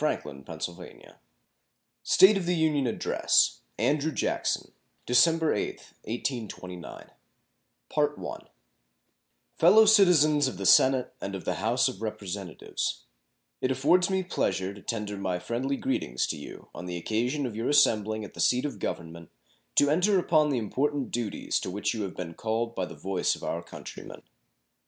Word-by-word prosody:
JOHN - - +1 0.3
QUINCY 90 - -5 0.2
ADAMS - - -17 0.9
State 195 +3 +6
of 190 -3 -2
the 180 - +2
Union 155 -5 +1
Address 115 - +2 0.2
Andrew 150 +2 +1
Jackson - - -1 0.3
December 160 +6 +4
8, 105 - -4
1829 110 - -6 2.5
Fellow 205 +7 +7
Citizens 160 -9 +5
of 95 - -5
the 95 - -5
Senate 130 +5 +5
and 100 - -4
of 95 - -7
the - - 0
House 120 +5 +2
of 120 -6 -5
Representatives: 100 -5 -4 0.6
It 130 - +1
affords 145 +8 +3
me 190 -1 0
pleasure 95 - -1
to 100 - -13
tender 105 -3 -4
my 95 -2 -2
friendly 125 +9 -2
greetings 65 - -1
to - - -3
you 75 - -10
on 90 - -8
the 90 -1 -4
occasion 120 - -1
of 120 -4 -5
your 115 +2 -2
assembling 110 -7 +3
at - - -12
the - - -13
seat 125 +3 +2
of 145 - -5
Government 85 0 -5 0.5
to 145 0 +4
enter 185 +5 +3
upon 155 -4 +3
the 135 - 0
important 135 +5 -1
duties 115 -4 -2
to - - -5
which 100 +3 -1
you 110 - -4
have 95 -3 -4
been 85 -2 -6
called 115 +4 -2
by 95 -5 -3
the - - -10
voice 95 -1 -1
of - - -13
our - - -2
country - - -10
men. - - -11
120 Hz, 155 wpm, -27 LUFS, 100-150 Hz, 2.5 s, Fellow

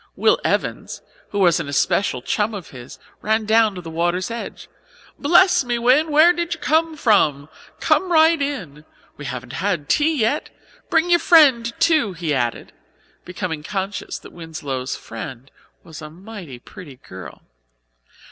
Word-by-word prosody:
Will - - +3
Evans, - - -2 0.3
who 205 - -5
was 175 -4 +3
an 140 - -5
especial 175 -3 0
chum 210 +7 -1
of 185 -6 -9
his, 125 -1 -11 0.2
ran 220 +1 0
down 220 -1 +3
to 180 - -6
the 165 - -9
water's 175 +5 -1
edge. 230 0 -7 0.5
"Bless 350 +3 +4
me, 240 -1 -1
Win, 255 +7 +3
where 310 +4 +6
did 340 -1 -3
you - - -18
come 320 +1 +1
from? 155 - +2 0.3
Come 370 -1 +1
right 320 -1 +4
in. 185 - -4 0.3
We 150 - -9
haven't 125 -1 -6
had 175 -5 -2
tea 310 +1 +2
yet. 230 +7 0 0.4
Bring 340 +2 +2
your 345 - +5
friend 270 -10 +5
too," 310 - +2
he 165 -3 -2
added, 120 -3 -2 0.5
becoming 180 -4 -5
conscious 195 +4 -4
that - - -14
Winslow's 145 -6 -5
friend 125 +3 -9 0.3
was 160 -1 -11
a 155 - -8
mighty 180 - -10
pretty 145 - -13
girl. 95 -7 -12
200 Hz, 155 wpm, -21 LUFS, -, 0.5 s, where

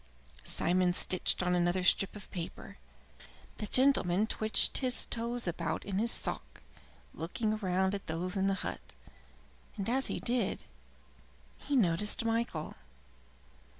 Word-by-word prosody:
Simon 180 - +2
stitched 185 0 +1
on 180 0 +1
another 175 +1 +1
strip 190 +3 +3
of 205 - -9
paper. 170 -3 -7 0.8
The 210 - -4
gentleman 215 -7 +3
twitched 220 0 +2
his 255 -2 +1
toes 235 +1 -3
about 170 - -2
in 195 -1 -2
his 230 +2 +1
sock, - - -1 0.5
looking 215 +7 -2
round 190 -1 0
at 200 - -5
those 175 +4 -2
in 195 0 +1
the 195 - +2
hut, - - -7 0.8
and 195 - -3
as 265 +3 +1
he - - -3
did 235 -5 0
so - - -21 0.9
he 290 - -2
noticed 210 +1 +2
Michael. 225 -9 -1
195 Hz, 135 wpm, -32 LUFS, 180-230 Hz, 0.9 s, strip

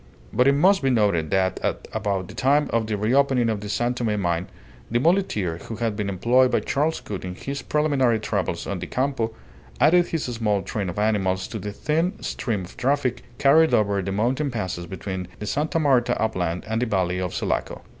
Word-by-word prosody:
But 125 - +3
it 140 - +6
must 190 +7 +4
be 135 - +2
noted 100 -10 +2
that 95 -1 +1
at - - -2
about 95 -3 -1
the - - -10
time 145 +2 +2
of 115 -1 +1
the 105 -1 -1
re 105 +4 0
opening 135 -4 +3
of 110 -2 -1
the 105 - -6
San 120 +4 0
Tome 110 -4 -1
mine 85 -1 -1 0.4
the 115 - +1
muleteer 120 - +1
who 115 - -6
had 115 -2 -1
been 105 -1 -2
employed 120 +7 +3
by - - +1
Charles 150 +3 0
Gould 100 -3 -6
in 90 -1 -5
his 140 +6 -5
preliminary 135 -6 +2
travels 100 -5 -2
on 100 -2 -3
the 90 - -5
Campo 130 -2 -1 0.5
added 170 +6 +5
his 165 -3 -2
small 110 -5 -1
train 100 0 -3
of 90 - -6
animals 95 -3 +1
to - - -5
the 105 - -5
thin 160 - -1
stream 105 -6 -2
of 90 - -15
traffic 125 -1 0 0.2
carried 155 +5 +5
over 100 -2 +1
the 95 +1 -3
mountain 125 +8 0
passes 95 -7 -4
between 95 -1 -5
the 105 - -6
Sta. 150 +8 -1
Marta 135 -6 +2
upland 90 -6 -1
and 110 +1 -1
the 125 - +1
Valley 90 -3 0
of 90 -2 -3
Sulaco. - - -2
110 Hz, 205 wpm, -24 LUFS, 95-135 Hz, 0.5 s, it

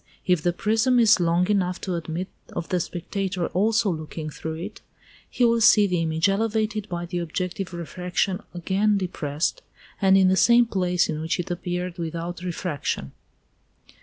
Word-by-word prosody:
If 180 -4 +2
the 175 - +2
prism 225 +7 +2
is 220 -4 +6
long 175 +1 +2
enough 185 -3 0
to 185 - -3
admit 170 +2 -3 0.3
of 170 - -4
the 180 - +1
spectator 180 +1 -3
also 210 +1 +2
looking 155 -1 -5
through 160 +2 -5
it, 165 +3 -7 0.5
he 245 - +2
will 230 0 +3
see 215 -1 +7
the 180 -3 0
image 160 +2 +1
elevated 215 +1 0
by 175 0 -3
the 175 0 -3
objective 180 +2 -3
refraction 180 +2 -2
again 195 +4 +1
depressed, 170 - -2 0.4
and 195 -1 +5
in 190 -1 +5
the 185 - +4
same 235 +6 +5
place 180 -5 +1
in 155 -1 -3
which 160 +2 -1
it 175 +1 -3
appeared 180 0 -3
without 170 +1 -4
refraction. 175 -4 -3
180 Hz, 165 wpm, -24 LUFS, 170-200 Hz, 0.5 s, see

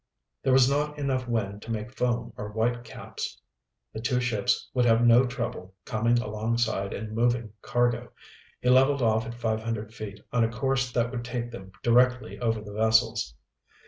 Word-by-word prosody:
There 135 - +1
was 130 -1 +6
not 150 +2 0
enough 130 -3 -1
wind 105 -3 -2
to 115 - -11
make 115 +3 -4
foam 120 -1 -1
or 105 - -6
whitecaps. 115 +1 -3 0.5
The 110 - -5
two 125 +1 +1
ships 120 -4 0
would 125 -2 +2
have 115 0 +4
no 120 +2 +6
trouble 110 -6 -5
coming 115 +1 +2
alongside 110 -2 -1
and 110 +1 -5
moving 115 -2 +1
cargo. 120 0 0 0.5
He 125 - +1
leveled 135 +1 +5
off 110 0 +2
at 120 - -6
five 110 -2 -1
hundred 110 -1 -4
feet 100 -3 -7
on 120 -1 +3
a 115 - +2
course 130 +2 0
that 120 -1 0
would 120 -2 -4
take 120 0 -4
them 95 -5 -10
directly 125 +1 +3
over 115 -2 0
the 105 -1 -9
vessels. 110 - +2
120 Hz, 175 wpm, -27 LUFS, 110-125 Hz, 0.5 s, was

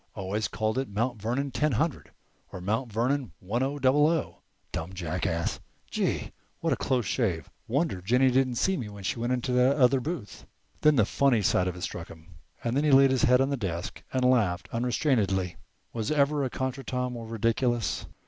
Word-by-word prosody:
Always 100 +3 -2
called 110 +3 -1
it 135 - -3
'Mount 115 +2 -2
Vernon 130 +6 -1
ten 150 +3 +1
hundred' 150 +6 -1 0.4
or - - -7
'Mount 110 +6 -2
Vernon 120 - 0
one 110 +7 -2
o 140 +2 -1
double 145 +2 +4
o.' 165 -1 -1 0.3
Dumb 80 +3 -4
jackass! 85 -1 -2 0.3
Gee! - - -1 0.3
what - - +1
a - - +1
close 125 -4 0
shave! 90 - -1 0.2
Wonder 135 - 0
Jennie 125 +7 +3
didn't 130 -1 +2
see 190 +10 +1
me 110 -8 -5
when 100 -1 -10
she 105 - -2
went 120 +2 -1 0.2
in 125 - 0
that 125 +2 +4
other 135 -1 +4
booth." 135 -7 -6 0.3
Then 150 -1 +5
the 115 -6 +4
funny 125 -2 +2
side 90 0 +2
of 90 - -3
it 90 - -9
struck 85 -2 -5
him, 80 +2 -14 0.3
and 120 +1 -1
he 155 - +3
laid 135 -1 +6
his 130 - +3
head 125 +1 +5
on 135 +1 +1
the 140 - 0
desk 90 -4 -4
and 130 -1 +1
laughed 110 -9 +2
unrestrainedly. 115 - 0 0.4
Was 110 -2 -2
ever 145 -1 +2
a 130 - -1
contretemps 130 -1 -3
more 115 -2 -7
ridiculous? 115 +1 0
120 Hz, 190 wpm, -28 LUFS, 100-135 Hz, 0.4 s, laid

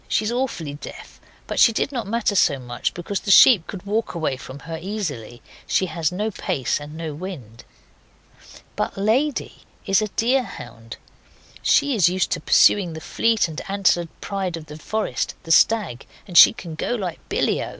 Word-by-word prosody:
She 215 - 0
is 215 - -1
awfully 240 - -3
deaf, 145 - -11 0.2
but - - -3
she 230 - +7
did 230 - -1
not 240 -6 -4
matter 230 0 0
so 170 -7 +3
much, 120 -2 -4
because 185 +3 -3
the - - -7
sheep 200 -2 +7
could 195 -2 -8
walk 215 -1 -2
away 160 -5 -1
from 130 +1 -10
her 165 +1 -6
easily. 155 - -5 0.2
She 190 - +1
has 165 -1 -2
no 210 +4 -2
pace 135 - -2
and 145 +1 -10
no 160 -2 -5
wind. 145 - -9 1.1
But - - -3
Lady 245 +9 0 0.3
is 195 +1 +3
a 215 - -1
deer 245 +6 +1
hound. 115 - -10 0.6
She 285 -1 +3
is 185 -6 +4
used 185 +1 -1
to - - 0
pursuing 185 -5 +4
that 160 - -8
fleet 225 -4 +1
and 160 -1 -7
antlered 185 -4 +1
pride 190 -4 -3
of 160 - -10
the 150 0 -11
forest 215 +7 -3
the 165 - -5
stag 185 - +3 0.2
and 180 - -10
she - - +10
can 185 -9 -9
go 205 +9 -2
like 185 -7 -4
billyo. - - 0
185 Hz, 180 wpm, -22 LUFS, 155-215 Hz, 1.1 s, she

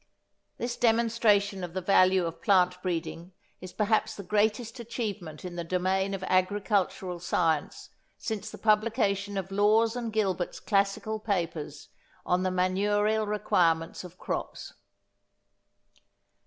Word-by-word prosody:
This 240 0 -3
demonstration 225 -4 +2
of 175 0 -6
the - - 0
value 185 -1 +4
of 165 0 -6
plant 180 -3 +3
breeding 175 0 -4 0.3
is 185 0 -9
perhaps 220 +1 +1
the 200 - -7
greatest 215 +5 0
achievement 210 -9 -5
in 175 -1 -6
the 170 - -2
domain 190 +3 0
of 190 - -7
agricultural 185 -1 0
science 165 -3 -1 0.3
since 220 -2 -4
the - - -10
publication 210 -2 +1
of 190 0 -4
Lawes 215 +3 +3
and 235 -2 -3
Gilbert's 190 -5 -1
classical 200 +2 0
papers 170 -8 -3 0.4
on 180 +1 +1
the 185 - +1
manurial 205 +4 +1
requirements 170 -6 +1
of 180 0 -11
crops. - - -5
195 Hz, 125 wpm, -28 LUFS, 180-215 Hz, 0.4 s, value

